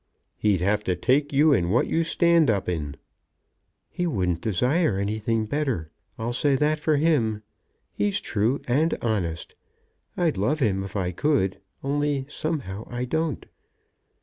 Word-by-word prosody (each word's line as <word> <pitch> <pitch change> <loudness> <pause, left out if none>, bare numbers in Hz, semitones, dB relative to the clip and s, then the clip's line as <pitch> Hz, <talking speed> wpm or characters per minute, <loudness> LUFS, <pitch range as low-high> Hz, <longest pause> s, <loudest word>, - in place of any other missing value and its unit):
"He'd 100 -5 +1
have 105 +3 +1
to 90 - +1
take 135 - +1
you 145 +2 +5
in 85 -9 +1
what 115 +6 +3
you 165 - +1
stand 170 -2 +3
up 100 -3 0
in." 75 -5 -3 1.0
"He 175 - -1
wouldn't 90 - -1
desire 125 - +1
anything 110 +2 -1
better. 115 - -2 0.3
I'll 115 +2 -3
say 140 +3 +2
that 150 +3 +1
for 155 0 +2
him. 120 -9 +1 0.5
He's 205 -1 0
true 115 - 0
and 150 +7 +2
honest. 90 -8 -2 0.6
I'd 170 -4 +1
love 130 +11 +1
him 100 -7 +1
if 95 +1 -8
I 90 -3 -1
could, 110 - 0 0.2
only, 145 0 0
somehow 135 - -4
I 120 +1 -3
don't." 160 +2 -2
120 Hz, 150 wpm, -25 LUFS, 100-150 Hz, 1.0 s, you